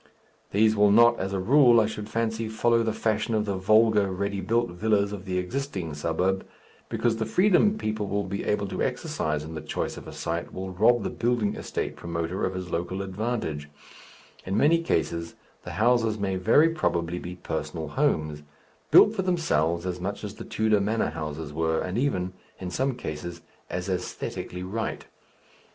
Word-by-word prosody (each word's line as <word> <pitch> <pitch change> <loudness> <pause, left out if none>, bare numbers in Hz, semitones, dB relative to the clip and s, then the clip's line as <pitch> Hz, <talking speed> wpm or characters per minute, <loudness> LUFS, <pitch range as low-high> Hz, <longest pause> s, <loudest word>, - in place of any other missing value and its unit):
These 110 +2 +3
will 105 0 +5
not, 120 +3 +6
as 95 0 -2
a 100 - -1
rule, 120 +3 +6
I 110 - +4
should 105 0 -5
fancy, 115 0 -1
follow 115 +1 +2
the 115 -1 0
fashion 110 +1 0
of 105 -1 +1
the 100 - -1
vulgar 105 +1 +4
ready 100 +1 -2
built 120 +1 +1
villas 100 +2 +1
of 95 -2 -7
the 90 -1 -2
existing 95 - -3
suburb, 90 +6 0 0.5
because 115 -2 0
the 110 - -1
freedom 205 - +4
people 110 - -2
will 100 +1 -1
be 100 +1 -4
able 105 -1 0
to - - -3
exercise 75 -1 -1
in 80 +1 -8
the 80 - -5
choice 75 - -3
of - - -10
a - - -7
site 85 +1 -3
will 95 0 -5
rob 120 +5 +3
the - - -2
"building 115 -3 0
estate" - - -4
promoter 85 +2 -3
of 95 - -1
his 90 -2 -5
local 95 +3 -2
advantage; 95 -7 -3 0.7
in 95 +2 -2
many 165 +7 +4
cases 85 - -1 0.3
the - - -6
houses 115 0 +2
may 100 -2 -1
very 115 - +5
probably 85 - -1
be 90 +1 -7
personal 80 -2 -4
homes, 75 0 0 0.5
built 210 - +7
for 190 - 0
themselves 85 - +1
as 90 -1 -3
much 100 +4 -4
as 105 -1 -5
the - - -9
Tudor 110 -2 +1
manor 110 +3 0
houses 75 -1 -5
were, 80 +1 +1
and 90 - -3
even, 95 -10 0 0.2
in 90 -2 -6
some 130 +7 0
cases, 85 -5 -6 0.3
as 90 +1 -3
æsthetically 90 -1 -4
right. 110 +4 -3
100 Hz, 180 wpm, -26 LUFS, 90-115 Hz, 0.7 s, built